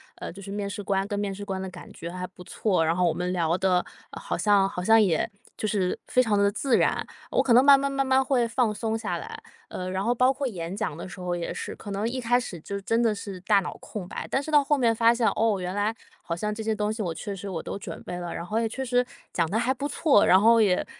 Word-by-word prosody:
呃， - - -7
就 195 - -11
是 195 - -8
面 200 0 -3
试 205 - -5
官 195 0 0
跟 205 -1 -3
面 205 -1 -2
试 205 +1 -7
官 190 -2 -3
的 190 - -4
感 175 -1 -11
觉 170 - -7
还 180 0 -5
不 180 0 -14
错， 180 -3 0
然 165 +1 +1
后 180 0 +2
我 165 - +2
们 180 +2 -2
聊 170 -1 +1
得 185 -1 +2 0.3
好 - - -4
像 205 -2 +4
好 180 -2 -5
像 225 +3 +6
也 185 -1 +1 0.3
就 215 - -2
是 190 -3 0
非 255 - +3
常 215 -4 +1
地 200 0 +3
自 240 +4 +1
然， - - +1 0.3
我 - - +3
可 245 - +3
能 250 +2 +7
慢 280 0 +8
慢 280 0 0
慢 275 0 0
慢 265 0 +3
会 255 -3 +2
放 230 -2 +1
松 220 +1 -2
下 220 -2 -3
来。 445 +1 -8 0.3
呃， 185 0 -5
然 190 0 -1
后 235 +3 +2
包 255 +2 +4
括 275 0 -2
演 175 -6 -5
讲 205 -8 -3
的 170 - -7
时 185 - -10
候 180 -1 -2
也 170 -1 -3
是， - - -5
可 205 - -9
能 200 +3 -1
一 255 +2 -3
开 245 +1 +3
始 190 -8 -6
就 200 +3 -5
真 225 +5 +1
的 230 -2 +3
是 200 -2 -7
大 200 +1 +4
脑 185 - -5
空 195 -5 -7
白， - - -6
但 265 - +1
是 300 - -7
到 295 -1 +6
后 295 +1 +2
面 235 -4 +2
发 230 +1 +5
现， 235 -1 +1
哦， 220 -2 +2
原 180 +1 -4
来， 205 +2 +1 0.3
好 170 - -4
像 210 +5 -2
这 220 +1 -5
些 220 0 0
东 210 0 -1
西 220 - -5
我 175 -5 -2
确 200 +5 -5
实 195 +1 -7
我 165 -3 -3
都 - - -5
准 200 - -8
备 180 - -6
了， 175 -1 -5
然 170 - -5
后 210 +5 -2
也 230 -1 0
确 265 +4 -4
实 245 0 +2 0.3
讲 170 -2 +1
得 220 - 0
还 245 +2 +1
不 275 +2 -5
错， 295 -8 +4
然 185 - +6
后 230 +2 +6
也 190 -4 +2
205 Hz, 310 characters per minute, -26 LUFS, 185-235 Hz, 0.3 s, 慢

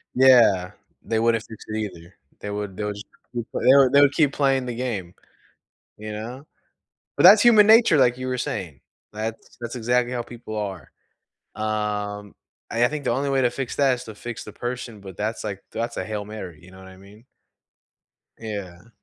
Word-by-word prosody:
Yeah, 120 -8 +5 0.3
they 110 - -1
wouldn't 115 0 +2
fix 110 -2 -11
it 110 - -4
either. 90 -5 -7 0.2
They 105 - -6
would 100 -2 -5
they - - -3
would 105 0 -3
just 105 - -9 0.3
keep 120 -2 -3
they 130 - +4
would 135 -2 +5
they 140 - +7
would 145 0 +5
keep 145 -1 +3
playing 135 -2 +1
the 120 -1 -4
game, 110 -8 -4 0.9
you 105 0 -7
know? 120 +7 -7 0.7
But - - +2
that's 200 +4 +9
human 220 -3 +7
nature, 220 -7 +6
like 125 -2 +3
you 130 - -5
were 130 0 -2
saying, 85 - -4 0.3
that's 110 +1 -6
that's 120 +1 -5
exactly 125 +1 0
how 120 - -2
people 120 -2 -9
are. 95 -9 -5 0.6
Um, 105 -1 -3 0.4
and 120 +1 +2
I - - +4
think 150 -1 -5
the - - +1
only 140 +3 -1
way 135 -1 +2
to 125 - +3
fix 135 -2 -5
that 135 -2 +3
is 125 - -8
to 110 - -9
fix 120 +2 -7
the 105 - -10
person, 120 -2 -6
but 95 -2 -11
that's, 110 +3 -3
like, 100 -3 -5
that's 115 +1 -3
a - - -2
Hail 105 -1 -4
Mary, 95 -7 -8
you 90 - -15
know 95 - -15
what 95 - -13
I 95 0 -14
mean? 100 +4 -17 1.2
Yeah. 100 -3 -7
115 Hz, 200 wpm, -23 LUFS, 105-125 Hz, 1.2 s, that's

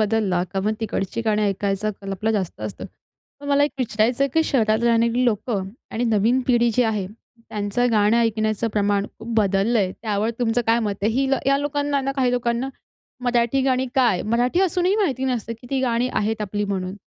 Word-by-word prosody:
बदलला 210 -4 +1
का 195 - -1
मग 215 +2 0
तिकडची 210 0 -2
गाणी 215 -1 +1
ऐकायचं 200 +1 0
कल 195 -1 -7
आपला 215 +3 -1
जास्त 195 -5 -3
असतं. - - -6 0.6
तर 285 - -9
मला 285 0 +4
एक 295 - -1
विचारायचं 235 +1 +1
आहे, - - 0
की 320 - +4
शहरात 220 -5 +1
राहणारी 235 +1 +2
लोकं 210 -4 -1 0.2
आणि 235 +2 -2
नवीन 225 +3 +2
पिढी 240 -2 +3
जी 250 - +4
आहे 215 -4 -1 0.4
त्यांचं 210 +4 -1
गाणं 210 0 +3
ऐकण्याचं 220 -1 +1
प्रमाण 205 -1 +1
खूप 225 +2 -10
बदललंय, 200 -1 +2
त्यावर 215 0 0
तुमचं 240 -1 +1
काय 230 +1 +4
मत 210 -3 -1
आहे? 215 - +2
हील 270 +3 +1
या 275 0 +4
लोकांनाना 285 -1 -1
काही 255 -2 +2
लोकांना, 240 +1 0 0.6
मराठी 245 +2 +2
गाणी 260 -1 +1
काय? 240 -9 +3
मराठी 240 - +1
असूनही 370 +1 +2
माहिती 270 - 0
नसतं, 240 -3 -2
की - - -13
ती 270 -1 0
गाणी 245 -1 +1
आहेत 215 +1 0
आपली 205 0 -2
म्हणून. 190 -2 -3
230 Hz, 185 wpm, -22 LUFS, 210-250 Hz, 0.6 s, मला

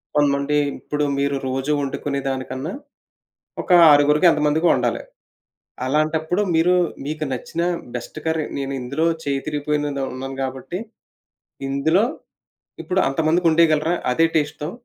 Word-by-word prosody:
కొంతమంది 145 0 +2 0.2
ఇప్పుడు 150 0 -3 0.2
మీరు 140 0 0
రోజు 135 +3 -2
ఒండుకునే 140 +1 -3
దానికన్నా 130 +4 -4 0.9
ఒక - - -15 0.2
ఆరుగురికి 150 +3 +5
ఎంతమందికొ 150 +3 +2
ఒండాలి. - - -1 0.8
అలాంటప్పుడు 155 +6 0
మీరు 175 +3 +4 0.3
మీకు 155 +1 -3
నచ్చిన 145 +6 -4 0.3
బెస్ట్ 125 +5 -7
కర్రీ 160 -1 0
నేను 140 0 -3
ఇందులో 140 +6 -1 0.2
చేయి 140 -1 -1
తిరిగిపోయిని 150 0 -1 0.2
ఉన్నాను 135 +1 -6
గాబట్టి 135 +7 -4 0.9
ఇందులో 160 +9 +2 0.8
ఇప్పుడు 185 +1 0
అంతమందికి 160 +4 +2
ఒండేయగలరా 160 0 +3 0.2
అదే 165 +5 +3
టేస్ట్‌తో? 150 +1 -1
150 Hz, 115 wpm, -21 LUFS, 140-160 Hz, 0.9 s, ఆరుగురికి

